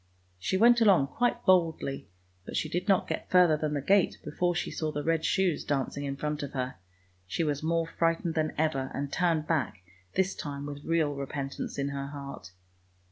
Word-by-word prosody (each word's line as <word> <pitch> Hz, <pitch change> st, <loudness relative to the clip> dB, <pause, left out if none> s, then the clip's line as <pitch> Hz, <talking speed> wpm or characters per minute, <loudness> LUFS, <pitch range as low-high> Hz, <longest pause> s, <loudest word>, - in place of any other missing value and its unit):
" 90 Hz, -, -38 dB
She 190 Hz, -, 0 dB
went 235 Hz, +3 st, +6 dB
along 185 Hz, -11 st, +5 dB
quite 240 Hz, -, 0 dB
boldly, 165 Hz, -7 st, +2 dB, 0.3 s
but -, -, -5 dB
she -, -, 0 dB
did 175 Hz, +5 st, -3 dB
not 195 Hz, -2 st, +3 dB
get -, -, -4 dB
further 180 Hz, -4 st, +6 dB
than 150 Hz, 0 st, -2 dB
the 140 Hz, -, -2 dB
gate 195 Hz, +3 st, +3 dB
before 175 Hz, +4 st, 0 dB
she 175 Hz, -, -2 dB
saw 155 Hz, -1 st, -2 dB
the 145 Hz, 0 st, -3 dB
red 165 Hz, -1 st, +1 dB
shoes 185 Hz, -5 st, +1 dB
dancing 140 Hz, 0 st, -2 dB
in 140 Hz, -1 st, -3 dB
front 150 Hz, +1 st, -3 dB
of 145 Hz, -1 st, -5 dB
her; 130 Hz, -1 st, -3 dB, 0.5 s
she 165 Hz, -, -1 dB
was 145 Hz, -2 st, -1 dB
more 165 Hz, +1 st, +1 dB
frightened 165 Hz, 0 st, 0 dB
than 155 Hz, -1 st, 0 dB
ever, 145 Hz, -4 st, 0 dB
and 140 Hz, 0 st, -3 dB
turned 165 Hz, -3 st, +1 dB
back, 135 Hz, -, -1 dB, 0.3 s
this 190 Hz, 0 st, +2 dB
time 145 Hz, -1 st, -6 dB
with 145 Hz, 0 st, -7 dB
real 160 Hz, -3 st, +1 dB
repentance 140 Hz, 0 st, -5 dB
in 140 Hz, 0 st, -1 dB
her 140 Hz, 0 st, -4 dB
heart. 140 Hz, -8 st, -8 dB
155 Hz, 195 wpm, -29 LUFS, 140-170 Hz, 0.5 s, went